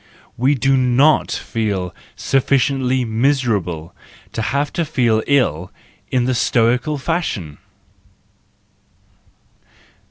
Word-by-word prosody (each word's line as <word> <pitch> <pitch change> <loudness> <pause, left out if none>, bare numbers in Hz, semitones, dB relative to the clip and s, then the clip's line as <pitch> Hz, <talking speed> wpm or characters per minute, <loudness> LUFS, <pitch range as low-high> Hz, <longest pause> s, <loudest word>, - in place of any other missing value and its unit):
We 130 +4 +2
do 135 +1 +2
not 130 +4 +3
feel 100 -6 -3 0.2
sufficiently 130 -1 +1
miserable 110 - -1 0.4
to - - -3
have 140 +5 -1
to 170 - 0
feel 120 -8 +1
ill 90 - +1 0.4
in 125 -1 +1
the 130 - +1
Stoical 125 +5 +1
fashion! 130 - -3
125 Hz, 90 wpm, -19 LUFS, 110-140 Hz, 0.4 s, not